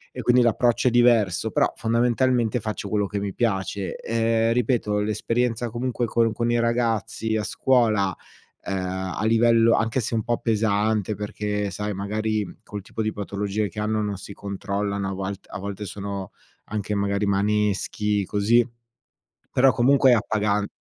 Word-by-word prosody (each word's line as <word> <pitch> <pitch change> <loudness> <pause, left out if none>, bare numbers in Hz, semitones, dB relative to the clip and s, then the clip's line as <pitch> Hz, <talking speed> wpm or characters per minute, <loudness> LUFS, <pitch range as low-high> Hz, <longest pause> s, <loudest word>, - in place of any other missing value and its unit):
E - - -4
quindi 125 0 +4
l'approccio 120 +1 +2
è - - -5
diverso; 115 -4 +3
però - - +2
fondamentalmente 120 0 +1
faccio 105 -1 -4
quello 105 -1 0
che 100 - -3
mi 100 -1 -3
piace. 100 -3 -1
Ehm, 115 0 +1
ripeto 115 -4 +1
l'esperienza 115 +3 -1
comunque 120 0 -2
con 115 0 +2
con 120 +1 -1
i 120 - +2
ragazzi, 115 -2 0
a 110 - +1
scuola, 110 -6 +2 0.5
ehm, 95 - -3 0.4
a - - -3
livello 115 0 +4
anche 115 +3 0
se 115 - -4
un 110 - +1
po' 120 -1 0
pesante 110 -2 0
perché, 105 0 -3
sai, 105 +2 -3
magari 105 +1 -2
col 105 -2 -7
tipo 110 - -5
di 110 0 0
patologie 100 +1 -3
che 105 - -8
hanno 110 0 0
non 100 -2 -3
si 100 +1 -9
controllano, 100 0 -3
a - - -3
volt 95 +1 -5
a - - -6
volte 100 +1 -5
sono 100 0 -6 0.3
anche 105 -1 -3
magari 100 0 0
maneschi, 105 0 0
così, 110 +5 +3 0.9
però 130 +1 +4
comunque 135 +1 +4
è - - +7
appagan 105 -2 0
110 Hz, 160 wpm, -24 LUFS, 100-115 Hz, 0.9 s, è